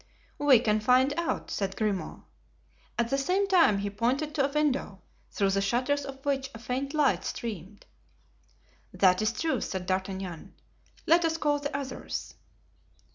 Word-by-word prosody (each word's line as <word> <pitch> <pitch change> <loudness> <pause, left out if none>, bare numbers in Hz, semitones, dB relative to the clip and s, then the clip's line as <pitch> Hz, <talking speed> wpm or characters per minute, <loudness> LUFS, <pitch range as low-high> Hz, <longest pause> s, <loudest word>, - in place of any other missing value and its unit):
"We 290 -3 +6
can 215 -2 +1
find 255 +5 +3
out," 340 -1 -2
said 195 -1 -2
Grimaud. 210 -4 -2 0.7
At 235 0 0
the 275 - +2
same 375 +8 +1
time 345 - +5
he 200 0 -3
pointed 255 +8 -1
to 280 -3 +2
a - - -12
window, 275 - -1 0.3
through 195 -2 0
the 195 0 +1
shutters 255 +7 0
of 270 0 -9
which 270 -1 0
a - - -6
faint 260 +5 -3
light 295 -3 +2
streamed. 205 -3 -6 1.1
"That 185 -1 +3
is 215 +1 +2
true," 320 +7 -1
said 190 -1 -4
D'Artagnan, 190 -2 -4 0.5
"let 335 +2 +5
us 325 -1 +1
call 295 -2 +1
the 285 0 -3
others." 275 -2 -5
255 Hz, 155 wpm, -28 LUFS, 200-285 Hz, 1.1 s, We